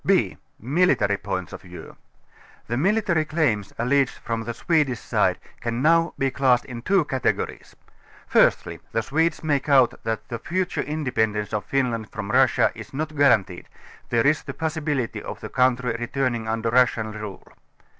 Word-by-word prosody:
10 -, -, +6 dB, 0.2 s
b) -, -, -16 dB, 0.2 s
Military 135 Hz, -, +2 dB
Points 95 Hz, -3 st, -4 dB
of -, -, -8 dB
View. 90 Hz, -1 st, -11 dB, 0.7 s
The 120 Hz, -, -3 dB
military 190 Hz, -, +2 dB
claims 140 Hz, -, 0 dB
alleged 130 Hz, +3 st, +1 dB
from 115 Hz, -1 st, -2 dB
the 120 Hz, +1 st, -4 dB
Swedish 150 Hz, -8 st, +1 dB
side, -, -, +1 dB, 0.2 s
can 120 Hz, +2 st, -2 dB
now 165 Hz, +1 st, +3 dB
be 135 Hz, 0 st, 0 dB
classed 130 Hz, -3 st, +2 dB
in 120 Hz, -3 st, -7 dB
two 190 Hz, +4 st, +2 dB
categories. 130 Hz, -3 st, -2 dB, 0.5 s
Firstly -, -, +2 dB
the 115 Hz, -, 0 dB
Swedes 160 Hz, +7 st, 0 dB
make 145 Hz, -2 st, 0 dB
out 130 Hz, -4 st, +5 dB
that 110 Hz, -1 st, -3 dB
the 115 Hz, -, -5 dB
future 185 Hz, +6 st, -2 dB
independence 110 Hz, -9 st, -1 dB
of 105 Hz, -, -2 dB
Finland 120 Hz, -5 st, -1 dB
from 105 Hz, -2 st, -5 dB
Russia -, -, +4 dB
is -, -, -10 dB
not 155 Hz, +1 st, -3 dB
guaranteed; 110 Hz, -11 st, +2 dB, 0.4 s
there 115 Hz, +1 st, +2 dB
is 150 Hz, +1 st, +3 dB
the -, -, -8 dB
possibility 155 Hz, -6 st, -2 dB
of -, -, -7 dB
the -, -, -7 dB
country 125 Hz, -2 st, +1 dB
re 120 Hz, -, -3 dB
turning 120 Hz, -4 st, -1 dB
under 115 Hz, 0 st, -1 dB
Russian 115 Hz, -3 st, +2 dB
rule. 105 Hz, -2 st, -8 dB
125 Hz, 165 wpm, -24 LUFS, 115-150 Hz, 0.7 s, 10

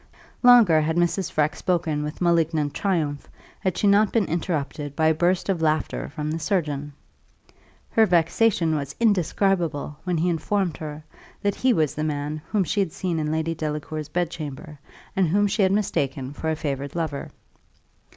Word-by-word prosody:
Longer 235 Hz, -11 st, +7 dB
had 160 Hz, +1 st, 0 dB
Mrs. 175 Hz, +2 st, +1 dB
Freke 150 Hz, 0 st, +1 dB
spoken 165 Hz, -5 st, 0 dB
with 150 Hz, +3 st, -5 dB
malignant 165 Hz, -4 st, +2 dB
triumph, 155 Hz, -8 st, -1 dB, 0.3 s
had 185 Hz, -2 st, -1 dB
she -, -, 0 dB
not 205 Hz, +1 st, +4 dB
been 225 Hz, -4 st, +2 dB
interrupted 150 Hz, -4 st, -3 dB
by 160 Hz, -, +1 dB
a 160 Hz, -, +5 dB
burst 175 Hz, +2 st, +1 dB
of 190 Hz, -4 st, 0 dB
laughter 155 Hz, -, 0 dB
from 150 Hz, -, -4 dB
the 160 Hz, -, -2 dB
surgeon. 150 Hz, -5 st, -2 dB, 1.0 s
Her 220 Hz, -1 st, +4 dB
vexation 175 Hz, 0 st, +2 dB
was 140 Hz, -2 st, -4 dB
indescribable 180 Hz, -7 st, +1 dB
when 180 Hz, -2 st, -1 dB
he 165 Hz, +3 st, +1 dB
informed 175 Hz, -1 st, -1 dB
her, 150 Hz, -1 st, -7 dB, 0.4 s
that 200 Hz, 0 st, +2 dB
he 260 Hz, +5 st, +2 dB
was 155 Hz, -, +1 dB
the 155 Hz, -, -3 dB
man 150 Hz, 0 st, -3 dB
whom 210 Hz, -3 st, +2 dB
she 205 Hz, -, -1 dB
had 190 Hz, -5 st, +1 dB
seen 175 Hz, -3 st, -2 dB
in 150 Hz, -1 st, -1 dB
Lady 160 Hz, +1 st, -1 dB
Delacour's 155 Hz, -1 st, -4 dB
bedchamber, 155 Hz, -3 st, -4 dB, 0.4 s
and 190 Hz, -2 st, +3 dB
whom 205 Hz, +6 st, +2 dB
she 205 Hz, +2 st, 0 dB
had 190 Hz, -1 st, +4 dB
mistaken 140 Hz, -9 st, -1 dB
for 160 Hz, +2 st, -3 dB
a 160 Hz, -, +1 dB
favoured 140 Hz, -1 st, -4 dB
lover. 160 Hz, -4 st, -3 dB
160 Hz, 170 wpm, -24 LUFS, 150-185 Hz, 1.0 s, Longer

